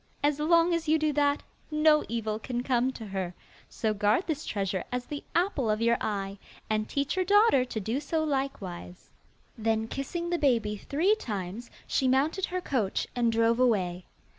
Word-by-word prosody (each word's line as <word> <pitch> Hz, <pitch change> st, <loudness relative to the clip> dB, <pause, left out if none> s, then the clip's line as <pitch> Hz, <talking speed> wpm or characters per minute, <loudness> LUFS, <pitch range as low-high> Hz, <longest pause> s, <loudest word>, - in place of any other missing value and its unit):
As 290 Hz, 0 st, +2 dB
long 335 Hz, +2 st, +4 dB
as 335 Hz, -1 st, -1 dB
you 315 Hz, +1 st, +4 dB
do 305 Hz, -1 st, 0 dB
that, 285 Hz, 0 st, +2 dB, 0.3 s
no 305 Hz, 0 st, +4 dB
evil 220 Hz, -2 st, -2 dB
can 245 Hz, +1 st, -3 dB
come 255 Hz, 0 st, +1 dB
to 225 Hz, -, -8 dB
her; 190 Hz, -3 st, -4 dB, 0.3 s
so 220 Hz, -2 st, -1 dB
guard 210 Hz, -, +2 dB
this 310 Hz, -2 st, -3 dB
treasure 195 Hz, -2 st, -1 dB
as 250 Hz, 0 st, -2 dB
the 290 Hz, -1 st, -6 dB
apple 340 Hz, -, +1 dB
of 215 Hz, 0 st, +1 dB
your 235 Hz, +1 st, +3 dB
eye, 200 Hz, -1 st, -3 dB, 0.3 s
and 215 Hz, 0 st, 0 dB
teach 280 Hz, +2 st, -1 dB
your 375 Hz, -, +2 dB
daughter 405 Hz, -, +5 dB
to 230 Hz, -, -4 dB
do 225 Hz, +6 st, -2 dB
so 315 Hz, +2 st, -1 dB
likewise.' 215 Hz, -, -4 dB, 0.5 s
Then, 220 Hz, 0 st, 0 dB
kissing 340 Hz, +8 st, -4 dB
the 345 Hz, -, +1 dB
baby 230 Hz, -7 st, +2 dB
three 315 Hz, -, +1 dB
times, 215 Hz, -, -5 dB, 0.2 s
she 265 Hz, -, +1 dB
mounted 290 Hz, +9 st, +2 dB
her 365 Hz, 0 st, -3 dB
coach 230 Hz, -, -1 dB
and 235 Hz, -2 st, +2 dB
drove 230 Hz, +1 st, +2 dB
away. 185 Hz, -8 st, +1 dB
250 Hz, 180 wpm, -28 LUFS, 215-305 Hz, 0.5 s, daughter